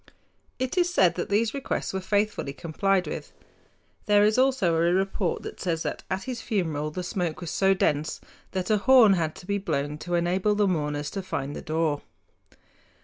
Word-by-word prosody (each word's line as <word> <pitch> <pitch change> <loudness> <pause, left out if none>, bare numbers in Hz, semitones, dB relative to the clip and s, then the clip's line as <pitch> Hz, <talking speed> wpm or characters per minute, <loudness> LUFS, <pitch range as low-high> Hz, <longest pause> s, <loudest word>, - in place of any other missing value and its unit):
It 260 +7 -1
is 355 0 +2
said 185 - +4
that 175 - -4
these 215 +2 +1
requests 275 -7 -3
were 190 - -2
faithfully 205 -7 0
complied 185 +5 0
with. - - -6 0.8
There 205 0 +5
is 215 +1 +3
also 255 -10 +3
a 165 - +1
report 185 +2 0
which - - -8
says 165 -3 -1
that - - -3
at 190 +1 -2
his 250 -3 -5
funeral 160 -10 -1
the 180 +4 -5
smoke 175 -3 -2
was 175 -2 -5
so 195 0 +3
dense 155 -3 0 0.3
that 185 +1 -1
a 215 - +4
horn 235 -2 +6
had 160 -4 -1
to - - -12
be 200 +1 -1
blown 150 -4 -2
to 175 +2 -2
enable 185 +4 +1
the 205 -1 +2
mourners 150 -4 -1
to 195 - -3
find 145 -6 -4
the - - -6
door. 155 -2 -1
185 Hz, 190 wpm, -26 LUFS, 160-205 Hz, 0.8 s, horn